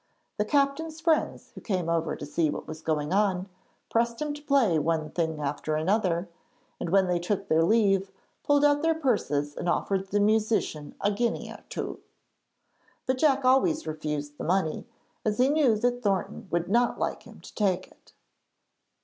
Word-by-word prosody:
The 210 - +1
captain's 290 +5 0
friends, 320 -1 0
who - - -10
came 185 -6 -2
over 165 -1 0
to - - -7
see 155 +2 0
what - - -4
was 155 0 -7
going 155 +1 -1
on, 195 -2 +1 0.4
pressed 235 0 +1
him 300 -1 -2
to 295 - -9
play 270 - +3
one 155 0 -1
thing 160 -3 -1
after 150 +1 -2
another, 180 +1 +1 0.5
and, - - -3
when 195 +2 +4
they 180 -1 0
took 195 +3 -2
their 160 -2 +3
leave, 195 0 +3 0.3
pulled 290 0 +3
out 290 0 +4
their 325 0 +2
purses 150 - 0
and 175 - -2
offered 195 +2 0
the 205 +2 0
musician 210 -7 +1
a 205 - +2
guinea 235 +3 -1
or - - -11
two. - - -4 1.1
But 260 0 0
Jack 275 -3 +3
always 300 +5 +3
refused 150 -1 -4
the - - -4
money, 180 +2 0 0.4
as 210 -1 0
he 255 +2 +4
knew 290 -6 +4
that 245 +2 0
Thornton 195 -3 -1
would 175 0 -1
not 235 +5 +2
like - - -2
him - - -14
to - - -13
take 190 -3 0
it. - - -24
200 Hz, 175 wpm, -27 LUFS, 165-250 Hz, 1.1 s, when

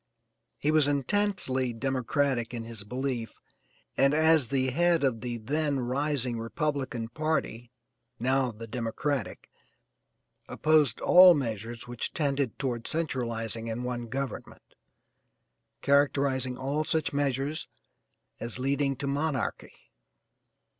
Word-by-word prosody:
He 150 - +1
was 155 -2 +4
intensely 140 - 0
Democratic 130 0 -1
in 115 - -4
his 115 -3 -7
belief 125 +1 -3 0.6
and 140 +2 +4
as 160 -4 +4
the 130 +1 0
head 170 +2 +3
of 120 -5 +1
the 120 0 -3
then 145 +4 -1
rising 130 -1 -1
Republican 130 -2 -2
party 125 -4 -2 0.5
now 130 +1 +1
the 115 +1 -9
Democratic 120 +5 -3 1.0
opposed 155 -5 +2
all 180 -1 +8
measures 115 -3 -4
which 120 -1 -4
tended 140 - 0
toward 120 -4 -3
centralizing 115 -7 -2
in 115 +2 -3
one 120 -1 -3
government, 135 +3 -6 1.1
characterizing 140 -2 +2
all 140 +4 -1
such 155 -1 0
measures 140 +2 -1 0.7
as 120 +1 -4
leading 135 +1 0
to 140 - -5
monarchy. 140 -2 -3
135 Hz, 110 wpm, -28 LUFS, 120-145 Hz, 1.1 s, all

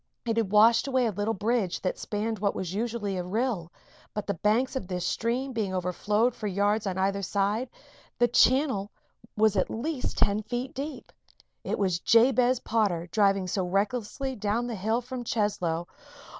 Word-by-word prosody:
It 230 -1 -1
had 220 -4 0
washed 225 +4 +5
away 260 -2 +2
a 225 - +1
little 205 +3 -1
bridge 210 -2 0
that 185 - -2
spanned 215 +1 -3
what 200 0 0
was 185 -1 -4
usually 215 -2 -2
a 180 - -2
rill, 195 -3 -2 0.4
but 210 - -3
the 200 - -1
banks 215 - +1
of 260 -9 -3
this 180 -2 -3
stream 250 +4 -1
being 205 -5 -2
overflowed 210 +6 +1
for 215 - -5
yards 205 +2 +1
on 190 -1 -2
either 195 +1 0
side, 205 +6 0 0.5
the 240 - +4
channel 245 -5 +3 0.5
was 215 -1 +4
at 185 - +1
least 270 +4 -3
ten 205 +1 +2
feet 245 +4 -4
deep. 280 +2 -6 0.5
It - - -2
was 185 -4 +1
Jabez 245 +3 +4
Potter 195 -7 0
driving 195 -3 +3
so 185 +1 -1
recklessly 215 +8 -1
down 215 +2 -1
the 240 - -4
hill 220 +4 0
from 250 0 -6
Cheslow. 180 -7 -1
215 Hz, 170 wpm, -27 LUFS, 195-240 Hz, 0.5 s, washed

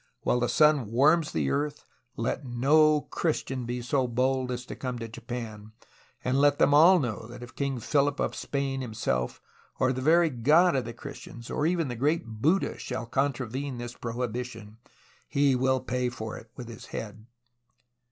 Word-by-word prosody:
While 125 - +2
the 120 -1 0
sun 150 -4 +4
warms 150 +6 +4
the 70 -4 0
earth 145 0 -2 0.3
let 115 +5 -2
no 150 +5 +4
Christian 135 -7 -2
be 120 0 -3
so 130 +1 +1
bold 130 +1 0
as 125 0 -4
to - - -7
come 125 -2 -4
to 115 -1 -5
Japan, 115 -2 -7 0.5
and 130 +2 +1
let 145 0 +4
them 145 - +4
all 170 +6 +8
know 115 -7 -3
that 120 +1 -10
if 120 - -11
King 140 -3 -2
Philip 145 +4 +1
of - - 0
Spain 135 -1 -2
himself, 110 - -2 0.4
or 130 0 +2
the 130 - -4
very 165 +3 +4
God 150 +8 +4
of 130 - 0
the 120 - -6
Christians, 120 -3 -9
or 150 - +1
even 170 -3 +1
the 120 - -4
great 145 +6 +1
Buddha, 125 - 0
shall 125 -1 -4
contravene 130 +1 -2
this 120 0 -6
pro 115 -2 -6
hibition, 115 -3 -5 0.5
he 140 -1 +3
will 130 +1 +2
pay 125 -1 -1
for 110 -3 -6
it 110 - -11
with 125 - -8
his 115 - -10
head.' 110 +1 -7
125 Hz, 180 wpm, -28 LUFS, 120-145 Hz, 0.5 s, all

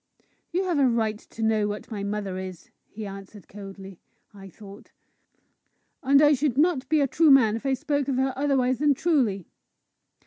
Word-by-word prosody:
"You 365 +2 0
have 350 -5 -1
a 270 - +4
right 220 -3 -1
to 225 - -9
know 220 -1 +1
what 210 +3 -7
my 205 -2 -5
mother 200 -2 -4
is," 185 -2 -9 0.2
he 215 0 -8
answered 195 +1 -11
coldly, 195 -2 -11 0.3
I 195 -1 -12
thought; 200 +2 -14 1.1
"and 280 +2 +4
I 295 0 +6
should 275 -2 -1
not 300 -3 +1
be 310 -1 +3
a 280 - +2
true 315 +4 +3
man 250 -6 +5
if 230 +5 -5
I 265 - +1
spoke 285 0 -2
of 275 - -1
her 265 +1 0
otherwise 260 -3 0
than 295 -1 +3
truly." 250 - 0
245 Hz, 180 wpm, -25 LUFS, 205-280 Hz, 1.1 s, I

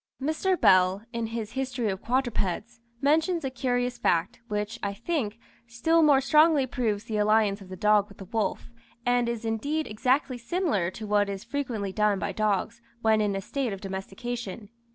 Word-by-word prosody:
Mr. 315 +6 0
Bell, 185 +2 +4
in 230 -1 -2
his 225 -1 -5
"History 260 -3 -2
of 190 +1 -3
Quadrupeds," 240 -2 -1 0.2
mentions 320 +3 +2
a 265 - -2
curious 245 -1 -1
fact, 170 +1 +1
which, 210 +1 -3
I 200 -1 -2
think, 230 -3 -2 0.3
still 285 +8 +2
more 290 -3 +5
strongly 300 +1 +5
proves 225 -5 -1
the 220 -2 -3
alliance 210 -1 +3
of 190 - -12
the 185 - -6
dog 210 +1 +3
with 200 - -15
the 195 - -9
wolf, 220 +4 -2 0.3
and 245 -1 +2
is 235 -1 -4
indeed 285 +8 -1
exactly 255 +4 0
similar 235 - 0
to 215 +3 -8
what 205 -1 +2
is 195 -1 -5
frequently 235 -6 -3
done 210 -1 +2
by - - -2
dogs 215 +1 -1 0.2
when 220 -1 +4
in 205 -2 0
a 195 - -2
state 255 +1 -2
of 195 - -6
domestication. 200 +2 -6
225 Hz, 175 wpm, -27 LUFS, 205-265 Hz, 0.3 s, more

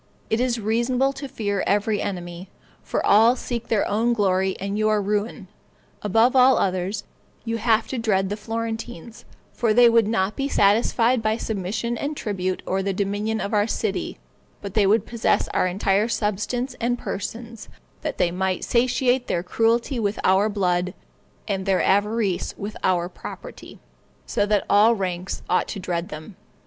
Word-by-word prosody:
It 220 - +2
is 245 -1 0
reasonable 240 +5 +1
to 275 +1 -7
fear 205 -6 -2
every 205 +1 +1
enemy, 175 -1 -5 0.3
for - - -2
all 225 +4 +6
seek 240 -2 -5
their 220 -3 +1
own 225 +4 +1
glory 190 -3 +1
and 200 +1 -3
your 215 0 +2
ruin; 205 +1 -2 0.5
above 225 +5 +3
all 260 0 +6
others, 190 +2 -1 0.4
you 230 0 -1
have 225 0 +2
to 260 - -3
dread 195 -4 +1
the 205 - -2
Florentines, 225 -1 -6 0.3
for 225 -3 +1
they 245 0 +7
would 230 -2 +4
not 210 -2 0
be 275 - -1
satisfied 230 +2 +3
by 220 0 0
submission 220 +2 -3
and 290 +1 -3
tribute, 185 -4 -3
or 190 +1 0
the 195 0 -1
dominion 205 +3 -1
of 200 - -3
our 210 0 +3
city, 215 -3 -2 0.4
but 200 -2 -7
they 205 -3 +3
would 215 +3 +3
possess 235 -2 0
our - - +1
entire 195 +3 +1
substance 235 +4 -2
and 240 +1 +1
persons, 230 +2 -6 0.3
that - - -4
they 170 - +2
might 185 +1 -1
satiate 250 +1 +1
their 170 - -1
cruelty 230 +6 +1
with 205 -1 -1
our 195 +3 +3
blood, 180 -3 0 0.5
and 195 -2 -2
their 190 -1 +2
avarice 205 -1 +1
with 205 +1 -6
our 175 -2 +2
property, - - -10 0.5
so 205 - 0
that 210 -1 +1
all 215 +3 +5
ranks 185 -2 -4
ought 180 - +1
to - - -5
dread 175 -1 -3
them. 155 +5 -9
210 Hz, 165 wpm, -23 LUFS, 195-230 Hz, 0.5 s, they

